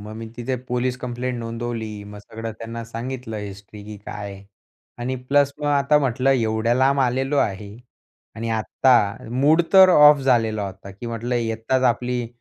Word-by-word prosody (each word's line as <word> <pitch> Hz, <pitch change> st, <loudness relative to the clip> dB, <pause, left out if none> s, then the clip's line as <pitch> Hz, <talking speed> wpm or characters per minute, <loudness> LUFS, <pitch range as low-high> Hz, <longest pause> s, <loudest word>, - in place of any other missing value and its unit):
मग 105 Hz, +1 st, -9 dB
मी 115 Hz, 0 st, -7 dB
तिथे 130 Hz, +2 st, -2 dB
police 125 Hz, +1 st, -1 dB
complaint 125 Hz, 0 st, -4 dB
नोंदवली, 115 Hz, -2 st, -5 dB
मग 105 Hz, 0 st, -10 dB
सगळं 110 Hz, +2 st, -7 dB
त्यांना 115 Hz, +1 st, -6 dB
सांगितलं 115 Hz, 0 st, -6 dB
हिस्ट्री 100 Hz, 0 st, -9 dB
की 105 Hz, 0 st, -8 dB
काय. 100 Hz, -1 st, -7 dB, 0.6 s
आणि 125 Hz, +2 st, -2 dB
प्लस 140 Hz, +2 st, +1 dB
मग 150 Hz, -, -4 dB
आता 145 Hz, +1 st, +3 dB
म्हटलं 135 Hz, -1 st, +1 dB
एवढ्या 115 Hz, -2 st, +1 dB
लांब 135 Hz, +2 st, +3 dB
आलेलो 135 Hz, +2 st, 0 dB
आहे 100 Hz, 0 st, -2 dB, 0.6 s
आणि 115 Hz, +1 st, -4 dB
आत्ता, 110 Hz, -1 st, +2 dB
मूड 145 Hz, +7 st, +3 dB
तर 190 Hz, -1 st, +9 dB
ऑफ 150 Hz, -3 st, +7 dB
झालेला 115 Hz, -6 st, +1 dB
होता 95 Hz, 0 st, -10 dB
की 100 Hz, +5 st, -9 dB
म्हटलं 115 Hz, +1 st, -3 dB
येताच 115 Hz, +2 st, -1 dB
आपली 125 Hz, 0 st, 0 dB
120 Hz, 160 wpm, -22 LUFS, 110-130 Hz, 0.6 s, तर